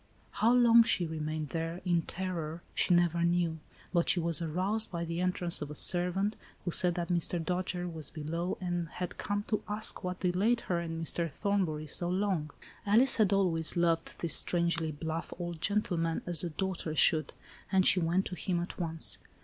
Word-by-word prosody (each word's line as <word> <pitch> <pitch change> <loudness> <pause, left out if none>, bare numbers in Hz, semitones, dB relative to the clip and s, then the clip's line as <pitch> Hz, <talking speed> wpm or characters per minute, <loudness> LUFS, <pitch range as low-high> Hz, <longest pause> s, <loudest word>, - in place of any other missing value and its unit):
How 230 - +2
long 235 -1 +7
she 185 -6 +1
remained 155 -1 -4
there 165 +1 -3
in 175 -2 +2
terror, 170 -2 -4
she - - +1
never 175 -1 +3
knew, 170 -2 +1 0.3
but 170 -1 +2
she 180 - +4
was 170 0 +2
aroused 185 +7 0
by 170 -2 -4
the 170 +1 -3
entrance 180 -1 0
of 150 - -4
a 150 - -7
servant, 185 +6 0 0.3
who 175 - -1
said 175 +1 +5
that 175 -1 -3
Mr. 175 0 +1
Dojere, 180 +1 -2
was 160 -5 -5
below, 165 +4 -4
and 175 -2 -2
had 180 0 -6
come 205 0 -2
to 215 0 -2
ask, 210 -1 0
what 180 0 -4
delayed 200 +6 +1
her 175 -2 -1
and 165 -1 -4
Mr. 165 -1 -1
Thornbury 180 -4 -1
so 175 +3 -2
long. 185 -5 -1 0.3
Alice 230 +6 +4
had 210 -3 +3
always 175 -5 +2
loved 165 -1 0
this 170 - +2
strangely 170 -2 +2
blflff 160 +4 -5
old 175 -2 -5
gentleman, 175 -4 0
as 175 -2 +3
a 175 - -2
daughter 170 -2 -3
should,, 155 -2 +4 0.4
and 190 -1 +3
she 185 - +5
went 175 +3 +1
to - - -5
him 175 +1 -2
at 175 +2 -6
once. 160 - +1
175 Hz, 185 wpm, -31 LUFS, 165-185 Hz, 0.4 s, long